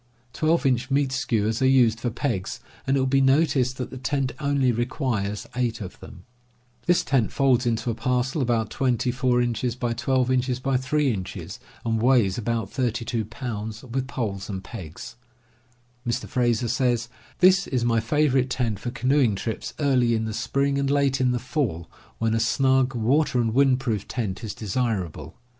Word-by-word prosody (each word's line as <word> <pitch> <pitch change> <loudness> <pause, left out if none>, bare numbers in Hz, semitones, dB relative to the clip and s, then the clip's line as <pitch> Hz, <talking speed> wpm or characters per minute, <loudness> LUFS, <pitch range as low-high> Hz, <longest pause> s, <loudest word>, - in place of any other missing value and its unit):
Twelve 160 +4 +1
inch 130 0 +1
meat 140 -1 +1
skewers 115 -4 0
are 130 - +4
used 120 -4 +4
for 120 - -1
pegs, 115 -5 -3 0.3
and 135 +1 +3
it - - +2
will 130 - +2
be 135 +1 +3
noticed 135 -2 +3
that 125 - -5
the 130 - -7
tent 135 0 -1
only 140 -3 +2
requires 120 -4 -2
eight 120 -2 -1
of 95 -4 -8
them. 90 -2 -12 0.6
This 175 - +4
tent 125 -6 +1
folds 130 -3 +2
into 115 0 0
a - - -2
parcel 125 +4 0
about 115 -4 0
24x12x3 125 +2 0
inches, 95 -3 -6 0.3
and 115 -1 0
weighs 120 -6 +3
about 115 -3 -2
32 120 -3 -1
pounds, 110 -1 -6
with 130 +1 -3
poles 105 -8 -4
and 95 -2 -4
pegs. 90 0 -9 0.9
Mr. 120 - -1
Frazer 120 -1 +1
says: 120 0 +1 0.3
"This 185 +2 +5
is 125 -3 0
my 115 -1 +3
favorite 135 +1 +2
tent 120 -6 -1
for 120 - -4
canoeing 130 -3 +2
trips 110 +3 -4
early 125 -5 +3
in 110 0 -1
the 110 - -3
spring 140 +5 0
and 140 -1 0
late 140 -2 +2
in 130 - +3
the 125 - +1
fall, 120 - -2 0.3
when 115 0 0
a 115 - +2
snug 130 +2 +2
water 125 +4 +2
and 115 -2 +1
wind 135 0 +4
proof 110 -6 -2
tent 105 -6 -3
is 110 - -5
desirable. 105 -5 -3
125 Hz, 160 wpm, -25 LUFS, 115-135 Hz, 0.9 s, This